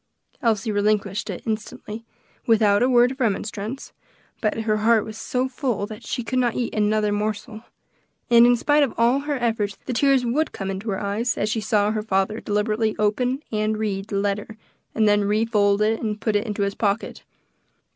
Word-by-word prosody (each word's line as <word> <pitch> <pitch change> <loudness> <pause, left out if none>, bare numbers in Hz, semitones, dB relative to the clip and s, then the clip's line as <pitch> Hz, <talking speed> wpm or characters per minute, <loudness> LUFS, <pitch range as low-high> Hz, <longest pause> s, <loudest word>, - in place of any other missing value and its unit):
Elsie 220 -2 +1
relinquished 205 -1 0
it - - -5
instantly, 220 0 -5 0.4
without 210 -3 +4
a 250 - +3
word 245 0 +5
of 265 - -9
remonstrance, 215 +2 -3 0.5
but 220 0 0
her 215 -1 +1
heart 220 0 +3
was 220 - -8
so 250 +3 -1
full 250 -5 -2
that 215 +1 -10
she 245 - -3
could 255 +2 -1
not 240 -2 +1
eat 240 - -2
another 210 0 +1
morsel; 215 +1 -3 0.7
and 235 0 +7
in 245 - +5
spite 290 +5 +2
of 275 -5 +1
all 235 +4 +3
her 290 +1 -2
efforts 220 -5 -1
the 255 - -3
tears 270 +1 +3
would 295 +7 0
come 195 0 -4
into 195 +4 -5
her 195 - -1
eyes, 210 +4 -1
as 210 - 0
she 220 0 -1
saw 210 -2 +1
her 215 -1 -1
father 210 +1 0
deliberately 215 +1 0
open 250 +7 0
and 215 0 0
read 200 -2 -2
the 210 - -4
letter, 205 +2 -2 0.4
and 220 -1 +3
then 205 0 +3
refold 210 -1 +2
and 215 -1 -1
put 220 -1 -1
it 205 +3 0
into 210 -1 -1
his 200 0 -1
pocket. 205 +1 -2
215 Hz, 185 wpm, -23 LUFS, 205-235 Hz, 0.7 s, and